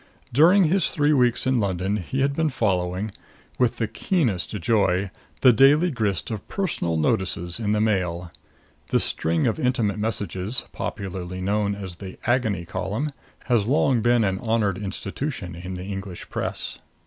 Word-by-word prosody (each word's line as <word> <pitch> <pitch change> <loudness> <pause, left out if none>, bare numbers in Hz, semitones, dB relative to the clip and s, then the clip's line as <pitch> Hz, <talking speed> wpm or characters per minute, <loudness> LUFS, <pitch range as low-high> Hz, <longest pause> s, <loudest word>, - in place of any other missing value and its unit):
During 175 +9 +6
his 175 +2 +3
three 150 0 +2
weeks 125 -3 +3
in 130 -1 +2
London 95 0 0
he 120 +8 -3
had 140 +1 +1
been 160 0 +1
following, 95 -4 -1 0.5
with 125 -2 +2
the 115 - 0
keenest 115 - 0
joy, 100 -2 +1 0.3
the 130 -2 +7
daily 145 +9 +5
grist 105 - -1
of 110 -3 -5
Personal 155 - -1
Notices 85 +3 -1
in 105 -2 -1
the 105 - +2
Mail. 90 -5 0 0.6
This - - +3
string 80 0 +1
of 115 - 0
intimate 115 -5 0
messages, 105 0 -2
popularly 90 -2 -5
known 100 +2 0
as 95 -4 -7
the 95 -1 -9
Agony 110 -8 +1
Column, 105 - -3 0.3
has 115 -5 +1
long 130 -2 +3
been 120 0 +3
an 95 -2 0
honored 110 -4 0
institution 100 - -4
in 90 +2 -6
the 90 0 -6
English 95 -2 -7
press. - - -2
105 Hz, 155 wpm, -24 LUFS, 95-125 Hz, 0.6 s, the